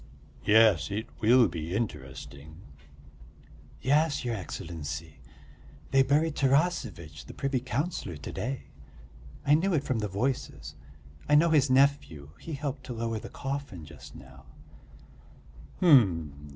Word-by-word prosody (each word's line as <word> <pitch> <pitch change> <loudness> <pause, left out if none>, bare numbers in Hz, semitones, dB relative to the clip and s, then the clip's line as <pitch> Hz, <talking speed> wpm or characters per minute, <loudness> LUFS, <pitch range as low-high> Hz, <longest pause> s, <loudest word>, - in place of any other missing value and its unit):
"Yes, 105 -7 +5
it 105 +3 -3
will 120 +1 +5
be 85 +1 -5
interesting." 70 - -6 1.2
"Yes, 145 +2 +2
your 120 - -1
Excellency, 80 -5 -6 0.7
they 135 - +5
buried 150 +4 +2
Tarasevitch, 135 - 0
the - - -10
privy 135 -2 -1
councillor, 130 - -3
to 75 - -8
day. 130 +3 -4 0.8
I 145 - +4
knew 175 +4 +3
it 145 - 0
from 130 -5 -1
the 105 - -1
voices. 115 +7 -3 0.6
I 150 - +5
know 165 +2 +5
his 145 -3 +4
nephew, 130 - +2
he 165 - -7
helped 140 -2 -4
to 125 - -5
lower 115 -1 -3
the - - -9
coffin 135 - -5
just 80 - -13
now." 65 0 -14
120 Hz, 125 wpm, -28 LUFS, 85-140 Hz, 1.2 s, Yes